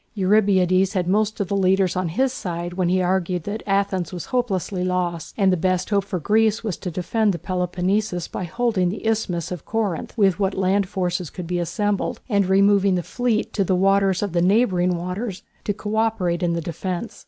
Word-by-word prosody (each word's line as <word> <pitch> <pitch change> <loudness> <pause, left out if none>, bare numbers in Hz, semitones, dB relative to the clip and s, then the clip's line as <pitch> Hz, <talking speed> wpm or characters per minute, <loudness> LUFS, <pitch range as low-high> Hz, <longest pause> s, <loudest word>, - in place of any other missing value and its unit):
Eurybiades 190 -2 +3
had 180 -3 0
most 210 +3 +1
of 200 - -1
the 200 - -1
leaders 190 -1 +2
on 185 -1 0
his 260 +9 0
side 175 -5 -4
when 180 -1 0
he 185 0 +2
argued 180 -1 0
that 205 +4 -4
Athens 195 -3 0
was 180 -3 -6
hopelessly 195 -6 -1
lost, 180 -3 -2
and 195 -3 +3
the - - +3
best 185 +2 0
hope 200 -1 +2
for 195 - -3
Greece 215 +6 +2
was 210 -6 -2
to 180 - -5
defend 195 +4 0
the - - -3
Peloponnesus 180 +2 -1
by 185 - -5
holding 200 -1 0
the 205 - -6
isthmus 190 -7 -1
of 180 -5 -5
Corinth 210 -3 -3
with 195 -4 +3
what 195 -1 0
land 190 0 +1
forces 180 -3 -2
could 180 - -7
be 175 +1 -2
assembled 200 +4 -1
and 200 -5 +2
removing 200 0 +4
the 175 - -1
fleet 240 0 -1
to 200 - +1
the 185 0 +1
waters 195 0 +2
of 200 -4 -3
the 170 - +2
neighbouring 180 -3 +2
waters 180 +3 -4 0.2
to - - +1
co 210 +1 -4
operate 215 -6 0
in 175 -1 +1
the 170 - -1
defence. 180 +5 -5
190 Hz, 200 wpm, -22 LUFS, 180-205 Hz, 0.2 s, removing